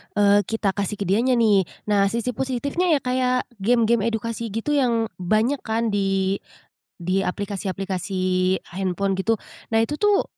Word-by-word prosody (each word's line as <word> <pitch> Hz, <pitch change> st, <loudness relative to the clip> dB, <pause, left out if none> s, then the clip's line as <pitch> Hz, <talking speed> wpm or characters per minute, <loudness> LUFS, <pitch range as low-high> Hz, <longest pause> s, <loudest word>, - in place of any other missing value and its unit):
eee, 205 Hz, 0 st, +4 dB
kita 225 Hz, -3 st, 0 dB
kasih 200 Hz, +2 st, -2 dB
ke 200 Hz, -, -3 dB
dianya, 235 Hz, +7 st, +2 dB
nih. 205 Hz, -6 st, +3 dB, 0.2 s
Nah, 200 Hz, -1 st, +4 dB
sisi 235 Hz, +3 st, -1 dB
positifnya 265 Hz, +8 st, -1 dB
ya -, -, +1 dB
kayak, 255 Hz, 0 st, +1 dB, 0.2 s
game-game 230 Hz, +1 st, +2 dB
edukasi 230 Hz, +1 st, -3 dB
gitu 225 Hz, +7 st, -3 dB
yang 235 Hz, -6 st, +1 dB
banyak 215 Hz, +9 st, +1 dB
kan, 225 Hz, 0 st, -1 dB
di 195 Hz, -1 st, 0 dB, 0.6 s
di 185 Hz, +3 st, 0 dB
aplikasi-aplikasi 190 Hz, -1 st, -1 dB, 0.2 s
handphone, 195 Hz, +1 st, -1 dB
gitu. 225 Hz, +4 st, +2 dB, 0.4 s
Nah, -, -, +5 dB
itu 295 Hz, +6 st, -2 dB
tuh, 415 Hz, -1 st, +3 dB
215 Hz, 145 wpm, -23 LUFS, 195-235 Hz, 0.6 s, Nah